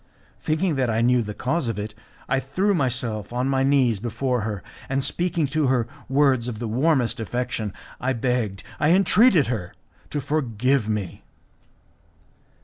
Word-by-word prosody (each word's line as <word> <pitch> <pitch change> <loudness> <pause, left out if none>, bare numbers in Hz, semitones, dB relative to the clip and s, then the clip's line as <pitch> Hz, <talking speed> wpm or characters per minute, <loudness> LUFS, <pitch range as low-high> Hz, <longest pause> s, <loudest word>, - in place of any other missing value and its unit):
Thinking 155 0 0
that 130 -2 +1
I 110 0 +1
knew 125 +1 +4
the 105 -2 -5
cause 135 +2 -1
of 115 -3 -2
it, 105 +1 -4 0.3
I 135 - +2
threw 185 +10 0
myself 125 - -1
on 125 +2 -1
my 135 -1 +1
knees 135 -6 +3
before 120 +2 -1
her, 105 -2 -4 0.3
and 135 0 0
speaking 170 +1 0
to 155 -2 +2
her 125 -3 +2 0.2
words 135 -3 +3
of 120 -3 -4
the 115 +1 -4
warmest 130 +1 +1
affection 115 -2 -2 0.3
I 130 +1 0
begged, 115 -5 -1 0.2
I 155 +4 +4
entreated 195 - +5
her, 105 -8 -4 0.3
to 150 - -2
forgive 130 -4 0
me. 105 -5 -3
125 Hz, 155 wpm, -24 LUFS, 115-140 Hz, 0.3 s, entreated